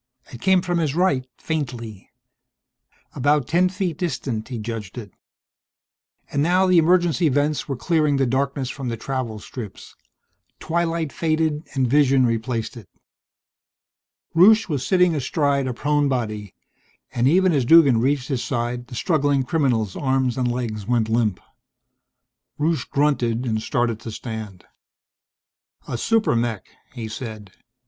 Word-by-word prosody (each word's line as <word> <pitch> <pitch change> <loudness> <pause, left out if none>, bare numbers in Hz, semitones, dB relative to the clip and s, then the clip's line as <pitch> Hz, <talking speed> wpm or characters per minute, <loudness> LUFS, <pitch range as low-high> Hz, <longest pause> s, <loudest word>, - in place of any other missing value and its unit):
It 120 - -9
came 190 -2 +3
from 175 -2 0
his 155 -3 -1
right, 140 -8 +1
faintly. 120 - -5 1.0
About 145 0 +1
ten 175 +4 +3
feet 185 -4 -3
distant, 130 -10 -3
he 125 - -5
judged 110 -1 -6
it. 105 -6 -8 1.2
And 140 - 0
now 180 +5 +3
the 185 -2 +5
emergency 170 -1 +3
vents 145 +2 0
were 135 - -2
clearing 150 0 +1
the 135 - +2
darkness 130 +1 -1
from 135 -2 -6
the 115 - -3
travel 125 -2 -4
strips. 105 0 -9 0.6
Twilight 165 -3 -1
faded 155 -1 -1
and 130 -2 +2
vision 135 -1 +4
replaced 115 +1 -2
it. 110 -7 -12 1.5
Rusche 215 +6 +6
was 145 -7 -2
sitting 180 -2 +3
astride 140 -1 0
a 125 - -2
prone 145 +2 +1
body, 110 -6 -3 0.6
and 120 +1 +2
even 185 +4 +4
as 140 -4 +2
Duggan 140 -3 +6
reached 135 +2 0
his 130 -4 -1
side 120 -1 -3
the 125 - -9
struggling 145 -2 +1
criminal's 125 - 0
arms 130 -3 0
and 125 -2 0
legs 110 -4 -4
went 115 -2 +1
limp. 110 -4 +1 1.2
Rusche 155 -3 0
grunted 130 -5 +1
and 110 -2 -1
started 115 0 -1
to 115 - -7
stand. 110 -5 -7 1.2
"A - - -3
super 220 - +1
mech!" 115 -5 -1 0.3
he 115 -3 -6
said. 110 -3 -7
130 Hz, 140 wpm, -22 LUFS, 115-155 Hz, 1.5 s, Rusche